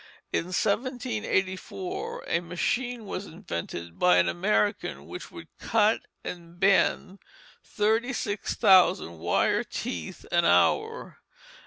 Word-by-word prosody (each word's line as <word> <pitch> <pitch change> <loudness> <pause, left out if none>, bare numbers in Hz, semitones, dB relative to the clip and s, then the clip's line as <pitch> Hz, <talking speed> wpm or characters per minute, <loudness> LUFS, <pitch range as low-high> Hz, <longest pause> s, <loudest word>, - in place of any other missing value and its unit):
In - - +1
1784 245 - -2
a 170 - +1
machine 230 +8 -2
was 200 0 -5
invented 85 - -6
by 90 0 +5
an 90 -1 +4
American 85 -5 0
which - - -8
would - - -11
cut - - +2 0.2
and 170 -1 -8
bend 195 0 +2 0.4
thirty 225 +3 +1
six 205 -5 -3
thousand 175 - +4
wire 85 +2 +1
teeth 85 -3 -6
an 170 0 +3
hour. 445 - +2
190 Hz, 110 wpm, -27 LUFS, -, 0.4 s, by